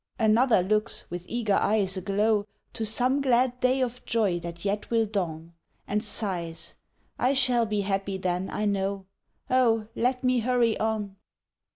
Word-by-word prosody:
Another 225 Hz, -2 st, +4 dB
looks, 215 Hz, +3 st, -1 dB
with 175 Hz, 0 st, -6 dB
eager 230 Hz, -4 st, 0 dB
eyes 200 Hz, -2 st, +2 dB
aglow, 205 Hz, +2 st, 0 dB, 0.3 s
To 225 Hz, -, -3 dB
some 255 Hz, +5 st, +1 dB
glad 250 Hz, -1 st, +2 dB
day 255 Hz, +1 st, +2 dB
of 250 Hz, -1 st, -3 dB
joy 210 Hz, -6 st, 0 dB
that 170 Hz, +1 st, -8 dB
yet 205 Hz, +1 st, -2 dB
will 230 Hz, -1 st, +2 dB
dawn, 170 Hz, -5 st, -4 dB, 0.3 s
And 210 Hz, +1 st, -1 dB
sighs, 175 Hz, -6 st, -3 dB, 0.5 s
"I 255 Hz, +3 st, +2 dB
shall 250 Hz, -4 st, +4 dB
be 210 Hz, -1 st, 0 dB
happy 195 Hz, 0 st, -2 dB
then, 185 Hz, 0 st, -2 dB
I 210 Hz, -, -2 dB
know; 195 Hz, -1 st, -1 dB, 0.4 s
Oh, 230 Hz, -4 st, +2 dB
let 250 Hz, +2 st, 0 dB
me 255 Hz, -1 st, +3 dB
hurry 235 Hz, -1 st, +2 dB
on." 215 Hz, -3 st, -2 dB
215 Hz, 155 wpm, -27 LUFS, 195-240 Hz, 0.5 s, Another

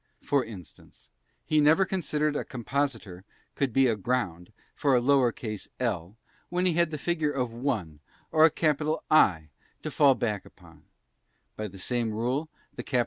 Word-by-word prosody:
For 140 Hz, -2 st, +2 dB
instance, 100 Hz, -8 st, -13 dB, 0.3 s
he 155 Hz, -1 st, +3 dB
never 160 Hz, +6 st, +5 dB
considered 150 Hz, -5 st, -1 dB
a -, -, -1 dB
compositor 120 Hz, -7 st, -3 dB, 0.3 s
could 140 Hz, -3 st, -1 dB
be 135 Hz, +3 st, +4 dB
aground 105 Hz, -6 st, -1 dB, 0.2 s
for 140 Hz, -3 st, +2 dB
a -, -, +5 dB
lowercase 120 Hz, -5 st, +1 dB
l 105 Hz, -5 st, -2 dB, 0.3 s
while 180 Hz, +1 st, 0 dB
he 180 Hz, -, +3 dB
had 170 Hz, -1 st, +2 dB
a 155 Hz, -, -3 dB
figure 160 Hz, 0 st, 0 dB
of 125 Hz, -4 st, -2 dB
1 110 Hz, -, -3 dB, 0.3 s
or 155 Hz, -, +5 dB
a 160 Hz, -, +8 dB
cap. 155 Hz, -1 st, +1 dB, 0.3 s
I 85 Hz, -, +4 dB, 0.3 s
to -, -, -4 dB
fall 140 Hz, -3 st, +5 dB
back 105 Hz, -5 st, -2 dB
upon; -, -, -18 dB, 0.7 s
by 110 Hz, -, -4 dB
the 95 Hz, -1 st, -12 dB
same 115 Hz, +3 st, -1 dB
rule, 125 Hz, +8 st, -1 dB, 0.2 s
the -, -, -6 dB
cap. 125 Hz, -, 0 dB
130 Hz, 160 wpm, -27 LUFS, 110-150 Hz, 0.7 s, a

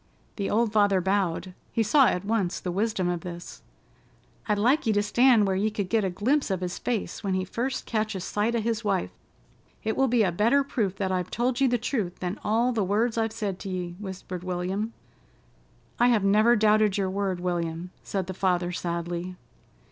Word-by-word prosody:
The 200 Hz, -2 st, -2 dB
old 220 Hz, 0 st, +1 dB
father 205 Hz, -3 st, +4 dB
bowed. 185 Hz, -1 st, -1 dB, 0.2 s
He 225 Hz, -, +1 dB
saw 260 Hz, +5 st, +5 dB
at 180 Hz, +2 st, -1 dB
once 200 Hz, -5 st, 0 dB
the 180 Hz, -, -4 dB
wisdom 195 Hz, -1 st, 0 dB
of 175 Hz, -1 st, -1 dB
this. 175 Hz, 0 st, -8 dB, 0.9 s
"I'd 210 Hz, -2 st, +2 dB
like 250 Hz, +7 st, +2 dB
ye 220 Hz, -, +3 dB
to 205 Hz, 0 st, +2 dB
stand 235 Hz, 0 st, +4 dB
where 190 Hz, -1 st, 0 dB
ye 205 Hz, +3 st, +1 dB
could 205 Hz, -3 st, -3 dB
get 225 Hz, -2 st, +2 dB
a 190 Hz, -, +1 dB
glimpse 240 Hz, +11 st, 0 dB
of 190 Hz, -2 st, -1 dB
his 180 Hz, 0 st, -3 dB
face 235 Hz, -4 st, -3 dB
when 195 Hz, -2 st, 0 dB
he 185 Hz, 0 st, -1 dB
first 250 Hz, +7 st, -3 dB
catches 215 Hz, -4 st, -2 dB
sight 215 Hz, +5 st, 0 dB
o' -, -, +2 dB
his 230 Hz, +1 st, -1 dB
wife. 195 Hz, -3 st, 0 dB, 0.7 s
It 220 Hz, -, -1 dB
will 270 Hz, -, +3 dB
be 240 Hz, -2 st, +3 dB
a 185 Hz, -, +2 dB
better 230 Hz, +10 st, +3 dB
proof 215 Hz, -8 st, -1 dB
that 195 Hz, -1 st, -2 dB
I've 180 Hz, -1 st, -1 dB
told 245 Hz, +3 st, -1 dB
ye 270 Hz, -, +5 dB
the 245 Hz, -1 st, +2 dB
truth 220 Hz, -6 st, -2 dB
than 180 Hz, +3 st, -4 dB
all 230 Hz, +4 st, +2 dB
the 225 Hz, -4 st, 0 dB
words 220 Hz, +5 st, +1 dB
I've 225 Hz, -1 st, 0 dB
said 210 Hz, -4 st, -3 dB
to 195 Hz, -, -6 dB
ye," 180 Hz, -2 st, -4 dB
whispered 185 Hz, -3 st, -6 dB
William. 185 Hz, +4 st, -2 dB, 1.1 s
"I 240 Hz, -, +5 dB
have 230 Hz, -5 st, +3 dB
never 215 Hz, +4 st, +5 dB
doubted 215 Hz, -2 st, +3 dB
your 190 Hz, -2 st, 0 dB
word, 195 Hz, -2 st, -1 dB
William," 175 Hz, -1 st, -3 dB
said 190 Hz, -2 st, -3 dB
the 190 Hz, -, -5 dB
father 180 Hz, -1 st, 0 dB
sadly. 175 Hz, +1 st, -3 dB
205 Hz, 200 wpm, -26 LUFS, 185-225 Hz, 1.1 s, saw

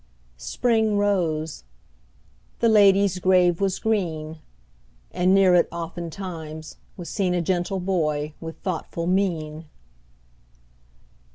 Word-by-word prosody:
Spring 220 Hz, -, 0 dB
rose; 165 Hz, -, -1 dB, 1.0 s
the 235 Hz, -, +3 dB
lady's 200 Hz, -3 st, +4 dB
grave 180 Hz, -1 st, +3 dB
was 195 Hz, -2 st, +1 dB
green; 160 Hz, -8 st, -2 dB, 0.7 s
And 180 Hz, +1 st, +1 dB
near 190 Hz, -2 st, +5 dB
it, 175 Hz, -, +4 dB
oftentimes, 165 Hz, -2 st, -7 dB, 0.2 s
was 175 Hz, -3 st, -7 dB
seen 185 Hz, -3 st, -1 dB
A 175 Hz, -, +1 dB
gentle 180 Hz, +2 st, -1 dB
boy 155 Hz, -5 st, -1 dB
with 165 Hz, 0 st, -7 dB
thoughtful 175 Hz, -3 st, -3 dB
mien. 165 Hz, -4 st, -1 dB
180 Hz, 100 wpm, -24 LUFS, 160-195 Hz, 1.0 s, near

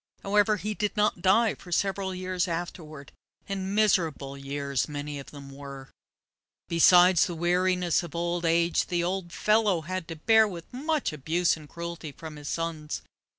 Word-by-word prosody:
However, 210 Hz, +1 st, +3 dB
he 210 Hz, +3 st, -3 dB
did 210 Hz, 0 st, -2 dB
not 210 Hz, -4 st, +1 dB
die 220 Hz, +4 st, +4 dB
for 180 Hz, -, -13 dB
several 195 Hz, +1 st, 0 dB
years 185 Hz, 0 st, -1 dB
afterward, 165 Hz, -4 st, -6 dB, 0.4 s
and 195 Hz, 0 st, -3 dB
miserable 165 Hz, -10 st, +1 dB
years 140 Hz, 0 st, -2 dB
many 145 Hz, 0 st, -5 dB
of 135 Hz, -, -10 dB
them 140 Hz, -2 st, -11 dB
were. 140 Hz, -1 st, -10 dB, 0.8 s
Besides 175 Hz, +2 st, +6 dB
the 175 Hz, -, -5 dB
weariness 180 Hz, +1 st, +1 dB
of 170 Hz, -2 st, -9 dB
old 170 Hz, +1 st, -1 dB
age, 170 Hz, 0 st, +2 dB
the 175 Hz, -1 st, 0 dB
old 180 Hz, 0 st, -2 dB
fellow 210 Hz, -5 st, +2 dB
had 185 Hz, +1 st, -4 dB
to 165 Hz, -, -6 dB
bear 220 Hz, +7 st, +4 dB
with 175 Hz, -4 st, -7 dB
much 300 Hz, -, -1 dB
abuse 160 Hz, +4 st, +1 dB
and 155 Hz, -2 st, -13 dB
cruelty 170 Hz, -2 st, -6 dB
from 155 Hz, +1 st, -10 dB
his 145 Hz, -1 st, -7 dB
sons. 165 Hz, -2 st, -3 dB
175 Hz, 160 wpm, -27 LUFS, 155-190 Hz, 0.8 s, Besides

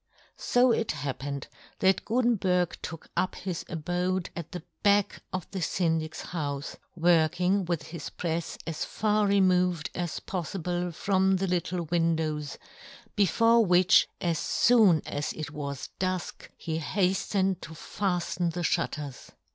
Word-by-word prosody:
So 245 Hz, 0 st, +4 dB
it 225 Hz, -1 st, +1 dB
Tiappened 140 Hz, -1 st, -4 dB, 0.3 s
that 190 Hz, -1 st, +3 dB
Gutenberg 205 Hz, -7 st, +1 dB
took 165 Hz, -1 st, -7 dB
up 185 Hz, -, 0 dB
his 185 Hz, -4 st, -4 dB
abode 180 Hz, +2 st, -1 dB
at 170 Hz, -2 st, -6 dB
the 180 Hz, -3 st, -6 dB, 0.2 s
back 205 Hz, -1 st, +3 dB
of 185 Hz, -3 st, -3 dB
the 190 Hz, -2 st, -4 dB
Syndic's 160 Hz, -3 st, -1 dB
houfe, 145 Hz, -4 st, -4 dB, 0.2 s
working 175 Hz, +3 st, +3 dB
with 170 Hz, -2 st, -1 dB
his 160 Hz, -3 st, -7 dB
prefs 170 Hz, -1 st, -3 dB
as 165 Hz, -2 st, -3 dB
far 210 Hz, -1 st, +1 dB
removed 180 Hz, -4 st, +2 dB
as 175 Hz, -2 st, -3 dB
pof 185 Hz, 0 st, -4 dB
fible 175 Hz, +1 st, -2 dB
from 190 Hz, +2 st, +2 dB
the 190 Hz, +1 st, 0 dB
Httle 180 Hz, -1 st, -1 dB
windows, 160 Hz, -3 st, 0 dB, 0.6 s
before 230 Hz, +3 st, +4 dB
which, 180 Hz, -1 st, +5 dB
as 170 Hz, -3 st, 0 dB
foon 215 Hz, -10 st, +4 dB
as 145 Hz, +1 st, -3 dB
it 155 Hz, -1 st, -6 dB
was 140 Hz, -2 st, -5 dB
dufk, 185 Hz, -1 st, -3 dB
he 160 Hz, -1 st, -3 dB
haftened 190 Hz, +2 st, 0 dB
to 160 Hz, -, -8 dB
faflen 175 Hz, 0 st, -2 dB
the 175 Hz, -, -3 dB
fhutters. 150 Hz, -5 st, -2 dB
175 Hz, 135 wpm, -28 LUFS, 160-190 Hz, 0.6 s, which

